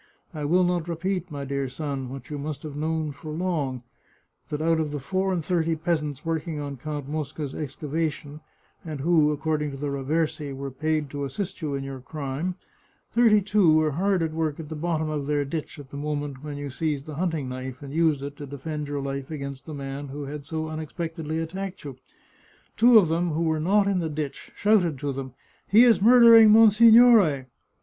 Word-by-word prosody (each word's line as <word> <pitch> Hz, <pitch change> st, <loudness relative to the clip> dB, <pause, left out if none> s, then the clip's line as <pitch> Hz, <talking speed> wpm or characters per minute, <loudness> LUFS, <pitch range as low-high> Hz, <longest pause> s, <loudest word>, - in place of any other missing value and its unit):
" -, -, -41 dB
I 150 Hz, -2 st, -4 dB
will 180 Hz, +5 st, +3 dB
not 175 Hz, -2 st, 0 dB
repeat, 180 Hz, +2 st, -2 dB
my 140 Hz, -2 st, -5 dB
dear 140 Hz, 0 st, -2 dB
son, 135 Hz, -1 st, -4 dB
what 135 Hz, +1 st, -9 dB
you 145 Hz, -, -4 dB
must 150 Hz, 0 st, -5 dB
have 150 Hz, -2 st, -7 dB
known 155 Hz, 0 st, -1 dB
for 155 Hz, +2 st, -9 dB
long 150 Hz, -7 st, -2 dB, 0.3 s
— -, -, -42 dB
that 150 Hz, -, -3 dB
out 165 Hz, +1 st, +2 dB
of 155 Hz, -2 st, -1 dB
the 145 Hz, 0 st, -4 dB
four 190 Hz, +7 st, -1 dB
and 170 Hz, -5 st, -2 dB
thirty 165 Hz, -1 st, +1 dB
peasants 155 Hz, -3 st, -2 dB
working 165 Hz, -1 st, -2 dB
on 140 Hz, -1 st, -5 dB
Count 145 Hz, +1 st, -5 dB
Mosca's 150 Hz, -1 st, -4 dB
excavation, 150 Hz, 0 st, -4 dB, 0.4 s
and 155 Hz, -4 st, -6 dB
who, 155 Hz, -1 st, +3 dB
according 150 Hz, 0 st, -1 dB
to 135 Hz, -, -7 dB
the 145 Hz, +1 st, -3 dB
Raversi, 145 Hz, +1 st, -2 dB
were 135 Hz, 0 st, -5 dB
paid 155 Hz, +1 st, -1 dB
to 145 Hz, -1 st, -4 dB
assist 185 Hz, +8 st, -5 dB
you 145 Hz, -3 st, -2 dB
in 135 Hz, -, -3 dB
your 135 Hz, -1 st, -6 dB
crime, 145 Hz, +5 st, -4 dB, 0.6 s
thirty 225 Hz, -3 st, +5 dB
two 205 Hz, -2 st, +3 dB
men 155 Hz, -, +6 dB
were 155 Hz, -1 st, +2 dB
hard 185 Hz, +3 st, +1 dB
at 160 Hz, -1 st, -2 dB
work 160 Hz, -2 st, -2 dB
at 155 Hz, -2 st, -7 dB
the 160 Hz, -, -5 dB
bottom 160 Hz, 0 st, -1 dB
of 150 Hz, -2 st, -3 dB
their 145 Hz, -1 st, +1 dB
ditch 155 Hz, +2 st, -5 dB
at 140 Hz, -2 st, -12 dB
the 140 Hz, -, -7 dB
moment 145 Hz, -2 st, -4 dB
when 145 Hz, -1 st, -6 dB
you 145 Hz, -1 st, -5 dB
seized 150 Hz, 0 st, -2 dB
the 155 Hz, -, -7 dB
hunting 165 Hz, -7 st, -1 dB
knife 130 Hz, +1 st, -6 dB
and 140 Hz, 0 st, -8 dB
used 155 Hz, -4 st, +2 dB
it 140 Hz, 0 st, -6 dB
to 145 Hz, -, -7 dB
defend 150 Hz, +2 st, -5 dB
your 145 Hz, -1 st, -3 dB
life 135 Hz, -1 st, -4 dB
against 140 Hz, -2 st, -6 dB
the 155 Hz, -, -6 dB
man 140 Hz, 0 st, -6 dB
who 145 Hz, +2 st, -6 dB
had 145 Hz, 0 st, -7 dB
so 160 Hz, +1 st, -3 dB
unexpectedly 160 Hz, 0 st, -4 dB
attacked 185 Hz, +4 st, -5 dB
you. 140 Hz, -3 st, -7 dB, 0.8 s
Two 235 Hz, +1 st, +7 dB
of 195 Hz, -6 st, +6 dB
them 165 Hz, +1 st, 0 dB
who 165 Hz, +2 st, 0 dB
were 160 Hz, -1 st, +1 dB
not 195 Hz, +6 st, +3 dB
in 195 Hz, -2 st, +1 dB
the 165 Hz, -2 st, -2 dB
ditch 150 Hz, -2 st, -5 dB
shouted 190 Hz, -8 st, +2 dB
to 140 Hz, +1 st, -3 dB
them, 130 Hz, -1 st, -7 dB, 0.2 s
* -, -, -33 dB
He 220 Hz, +4 st, +7 dB
is 235 Hz, -5 st, +5 dB
murdering 230 Hz, -1 st, +8 dB
monsignore! 220 Hz, -, +7 dB
155 Hz, 210 wpm, -25 LUFS, 140-170 Hz, 0.8 s, murdering